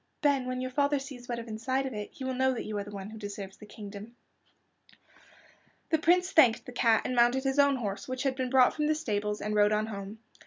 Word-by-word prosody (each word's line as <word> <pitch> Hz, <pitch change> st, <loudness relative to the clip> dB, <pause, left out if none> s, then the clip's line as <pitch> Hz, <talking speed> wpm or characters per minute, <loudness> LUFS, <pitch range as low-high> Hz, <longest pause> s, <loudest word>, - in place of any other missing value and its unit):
"Then, 275 Hz, -3 st, +2 dB
when 255 Hz, 0 st, -3 dB
your 255 Hz, 0 st, -3 dB
father 285 Hz, +2 st, +2 dB
sees 270 Hz, -3 st, -9 dB
what 240 Hz, -, -2 dB
is 235 Hz, 0 st, -7 dB
inside 255 Hz, +5 st, -2 dB
of 265 Hz, -, -4 dB
it 210 Hz, -1 st, -5 dB
he 270 Hz, -, -9 dB
will 260 Hz, 0 st, -2 dB
know 260 Hz, 0 st, +1 dB
that -, -, -5 dB
you 215 Hz, -, -5 dB
are -, -, -3 dB
the 205 Hz, -, -10 dB
one 200 Hz, 0 st, -7 dB
who 220 Hz, -, -9 dB
deserves 200 Hz, -2 st, -7 dB
the 210 Hz, -, -13 dB
kingdom." 210 Hz, +2 st, -10 dB, 1.8 s
The 320 Hz, -, +3 dB
Prince 360 Hz, +3 st, +3 dB
thanked 250 Hz, -8 st, +5 dB
the -, -, -8 dB
cat, 230 Hz, -2 st, +3 dB
and 255 Hz, -, -1 dB
mounted 245 Hz, +2 st, +4 dB
his 270 Hz, +1 st, 0 dB
own 280 Hz, -1 st, +5 dB
horse, 205 Hz, -6 st, -4 dB
which 255 Hz, +1 st, -3 dB
had 270 Hz, -2 st, 0 dB
been 260 Hz, -1 st, -2 dB
brought 255 Hz, -1 st, +5 dB
from 300 Hz, -1 st, -1 dB
the 310 Hz, -, +2 dB
stables, 210 Hz, -7 st, -2 dB
and 210 Hz, -, -2 dB
rode 210 Hz, 0 st, +4 dB
on 215 Hz, 0 st, +1 dB
home. 200 Hz, -1 st, -7 dB
245 Hz, 245 wpm, -29 LUFS, 210-265 Hz, 1.8 s, thanked